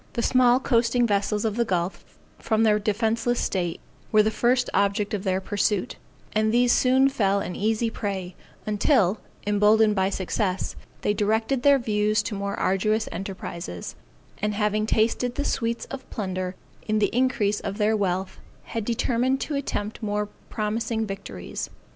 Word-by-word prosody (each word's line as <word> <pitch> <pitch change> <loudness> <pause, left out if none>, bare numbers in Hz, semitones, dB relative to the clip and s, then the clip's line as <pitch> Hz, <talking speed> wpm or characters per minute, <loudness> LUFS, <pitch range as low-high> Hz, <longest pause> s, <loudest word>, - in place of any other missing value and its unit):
The 235 - -1
small 250 0 +4
coasting 240 -1 +2
vessels 210 0 0
of 220 0 -1
the 235 - +3
gulf, 180 -4 -2 0.4
from 220 0 +1
their 210 -1 +4
defenceless 225 +3 0
state, 175 -3 -1 0.3
were 215 -1 +6
the 215 - +1
first 245 +3 +2
object 200 +1 +1
of 200 -2 -2
their 190 -2 +1
pursuit, 205 0 -1 0.4
and 215 0 +2
these 245 +1 +4
soon 260 +1 +4
fell 200 -7 +1
an 180 -2 -4
easy 225 +2 0
prey; 190 -4 -4 0.3
until, 210 - +2 0.3
emboldened 210 +1 +4
by 190 -1 +2
success, 190 0 -2 0.3
they 205 - +1
directed 220 +5 +1
their 280 +1 +6
views 215 -3 +1
to 215 - -4
more 200 0 -3
arduous 215 +4 +1
enterprises, 170 - -6 0.5
and 210 0 -1
having 210 0 +1
tasted 230 +3 +1
the 285 - -2
sweets 230 0 -1
of 270 -1 -7
plunder 185 -3 -3 0.3
in 215 0 +1
the 210 +1 +1
increase 240 -5 +1
of 200 0 -5
their 215 0 +2
wealth, 190 -2 -1 0.2
had 225 - -4
determined 245 +3 +1
to 305 - -3
attempt 225 -7 -3
more 210 -1 -1 0.2
promising 220 +1 -1
victories. 195 - -6
215 Hz, 155 wpm, -25 LUFS, 200-230 Hz, 0.5 s, were